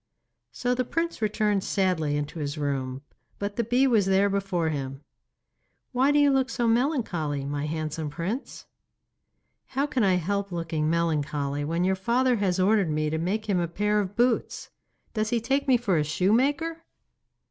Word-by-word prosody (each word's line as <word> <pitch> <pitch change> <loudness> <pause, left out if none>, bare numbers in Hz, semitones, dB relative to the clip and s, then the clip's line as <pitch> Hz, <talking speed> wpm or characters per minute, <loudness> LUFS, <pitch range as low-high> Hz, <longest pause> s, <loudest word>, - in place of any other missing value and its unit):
So 245 0 -1
the 255 0 0
prince 330 +2 -2
returned 210 -2 +1
sadly 170 -7 0
into 145 +3 -4
his 145 0 -3
room, 135 -2 -2 0.3
but 200 0 -4
the 235 - 0
bee 245 +4 +3
was 220 -7 +3
there 195 +1 +3
before 195 -4 0
him. 135 -2 -4 0.9
'Why 260 +2 +3
do 290 - +3
you 290 -1 +5
look 265 -1 +2
so 240 -2 0
melancholy, 225 - 0
my 145 +1 -3
handsome 155 0 -3
Prince?' 185 - -5 1.0
'How 275 +2 0
can 260 -5 0
I 190 -2 +4
help 200 +3 -1
looking 165 -3 -1
melancholy 150 -3 0
when 165 +4 -1
your 190 +1 +2
father 240 +6 +1
has 190 -3 0
ordered 195 -1 +3
me 155 0 0
to 160 - -1
make 210 +6 -2
him 195 -4 +1
a 170 - 0
pair 210 +5 0
of 200 -1 -3
boots? 240 0 0 0.4
Does 215 -1 0
he 235 - +1
take 270 +5 0
me 260 -2 +5
for 205 -7 0
a - - +2
shoemaker? 275 - +1
195 Hz, 170 wpm, -26 LUFS, 155-235 Hz, 1.0 s, you